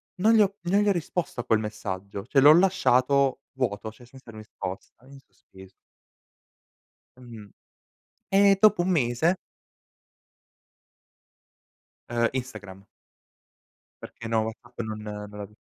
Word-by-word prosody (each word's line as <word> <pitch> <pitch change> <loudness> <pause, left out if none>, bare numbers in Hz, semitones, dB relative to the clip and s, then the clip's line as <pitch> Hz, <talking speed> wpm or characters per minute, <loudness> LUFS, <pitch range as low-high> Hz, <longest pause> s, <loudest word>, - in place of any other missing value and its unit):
non 215 +4 +3
gli 220 - +5
ho 200 -1 +1
non 190 +4 +2
gli 210 - +2
ho - - +5
risposto 175 -4 -3
a 120 - -3
quel 110 - +2
messaggio, 100 -2 -6
cioè 135 +3 +2
l'ho 145 +3 +9
lasciato 140 -8 +2
vuoto, 110 -5 -3
cioè 115 - -18
senza 130 0 -16
risposta, 110 +1 -9
in 140 0 -14
sospeso. 95 -7 -18 1.5
Mh-mh. 115 -5 -12 0.8
E 195 0 +5
dopo 210 -4 +5
un 185 - -1
mese 155 +2 +1 2.7
Ehm, 115 0 +1
Instagram. 105 -7 -7 1.2
Perché 115 - -10
no, 115 -1 +1
WhatsApp 120 +2 -8
non, 110 -2 -4
ehm, 105 0 -6
non 105 - -11
l'av 100 0 -8
120 Hz, 125 wpm, -26 LUFS, 105-170 Hz, 2.7 s, l'ho